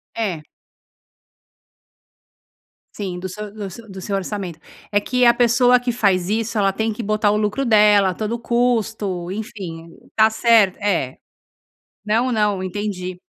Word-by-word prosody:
É. 195 -9 -2 2.5
Sim, 190 -4 -4
do 190 +1 -5
se 210 +3 -7
do 205 -2 -7
seu 225 +3 -12
do 190 0 -8
seu 195 +2 -2
orçamento, 195 -3 -5 0.3
é 205 - +2
que 250 +4 +1
a 235 0 +6
pessoa 245 +1 +4
que 245 0 -2
faz 195 -6 +1
isso 225 +1 -1
ela 195 -1 +2
tem 220 +3 -1
que 220 - -6
botar 215 0 +1
o 210 - +1
lucro 210 +5 -1
dela, 210 -4 +4
todo 215 +4 -3
o 235 - -2
custo, 225 -7 -1
enfim. 190 -6 -7 0.3
Tá 220 0 +5
cert 220 -4 +4
É. 175 -11 -1 0.9
Não, 230 +4 +1
não, 210 -4 0
entendi. 185 -2 -4
210 Hz, 150 wpm, -20 LUFS, 190-225 Hz, 2.5 s, a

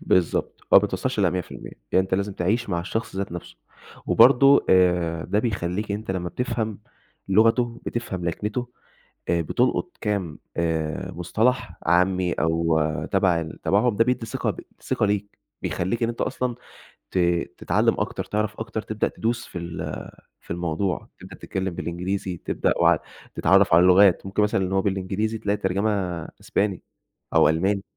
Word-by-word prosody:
بالضبط 90 -3 0
آه، - - +7
ما - - +12
بتوصلش - - -1
ل100%، 90 -2 -2 0.2
يعني 95 - +5
أنت 95 - -2
لازم 100 +1 -1
تعيش 105 +7 0
مع 85 -3 0
الشخص 110 +3 -4
ذات 100 -2 -3
نفسُه، 85 -8 -8 0.5
وبرضه 135 +3 +6
آآ، 90 -3 +3
ده 105 - 0
بيخلّيك 100 -2 -2
أنت 105 0 -4
لمّا 90 -2 -2
بتفهم 115 -2 -3 0.5
لغتُه، 115 +4 +3
بتفهم 95 -7 -3
لكنتُه 105 +8 -2 0.6
آآ، 85 0 +2
بتلقُط 125 - 0
كام 100 -8 -2 0.2
آآ، 80 -2 -1
مُصطلح 110 +3 0
عامّي 90 +1 +2
أو 80 -1 +1 0.3
تَبَع 90 -3 +3
ال 80 -1 -8
تبعهم، 105 +3 +2
ده 115 - +4
بيدّي 125 -1 -1
ثقة - - -2
ب - - -6 0.2
ثقة - - 0
ليك، 100 0 -2 0.2
بيخلّيك 95 +7 -2
إن 115 - +2
أنت 120 - -5
أصلًا 125 -1 -1 0.6
ت - - -2 0.4
تتعلم - - +1
أكتر، - - -2
تعرف 105 0 -2
أكتر، 110 -1 -3
تبدأ 110 0 -1
تدوس 120 +2 -2
في - - -8
ال 85 -1 -5 0.4
في - - -22
الموضوع، 85 +2 -2
تبدأ - - -11
تتكلم 95 -2 -4
بالإنجليزي، 90 +2 -3
تبدأ - - 0
وع - - +5 0.4
تتعرف 95 -2 +4
على 85 - +7
اللُغات، 95 +1 +5
ممكن 100 +2 0
مثلًا 105 -2 +1
إن 95 - -5
هو 95 0 +2
بالإنجليزي 100 +3 -1
تلاقي 105 -1 0
ترجمة 100 +2 0 0.5
أسباني 100 -3 -1 0.5
أو - - +6
ألماني. 95 +5 +1
95 Hz, 155 wpm, -24 LUFS, 90-110 Hz, 0.6 s, ما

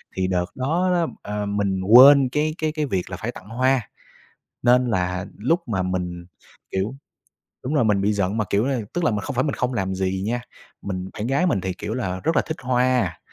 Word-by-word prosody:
thì 95 0 0
đợt 90 -1 0
đó 165 +8 0
đó, 170 -2 +1 0.2
ờ, 105 0 -3
mình 100 -2 -1
quên 130 +6 +8
cái 155 +4 -1
cái 155 -1 -1
cái 155 -1 -2
việc 95 -9 -2
là - - -5
phải - - -4
tặng 100 - -13
hoa, 130 -1 +1 0.7
nên 125 +1 +4
là 90 -2 -1
lúc 165 - 0
mà 95 -5 -1
mình, 90 -1 -3 0.5
kiểu 100 +7 -2 0.7
đúng 135 +5 -3
rồi 140 - +3
mình 100 -2 +2
bị 105 +1 +2
giận 100 +1 -1
mà, 105 - 0
kiểu 100 +3 +2
là, 135 -2 0
tức 175 - -1
là - - +3
mình 105 - -1
không 140 +4 -5
phải 130 - +2
mình 145 - -1
không 125 +1 -1
làm 95 -4 -2
gì 95 0 -1
nha. 120 +2 -1 0.4
Mình 95 -1 -5
bạn 105 +3 -4
gái 140 +7 +1
mình 100 - +1
thì, 95 0 -3
kiểu 105 +4 -5
là, 95 -7 -3
rất 165 - +1
là - - +4
thích 160 - -4
hoa, 125 -8 +1
110 Hz, 225 wpm, -23 LUFS, 95-135 Hz, 0.7 s, quên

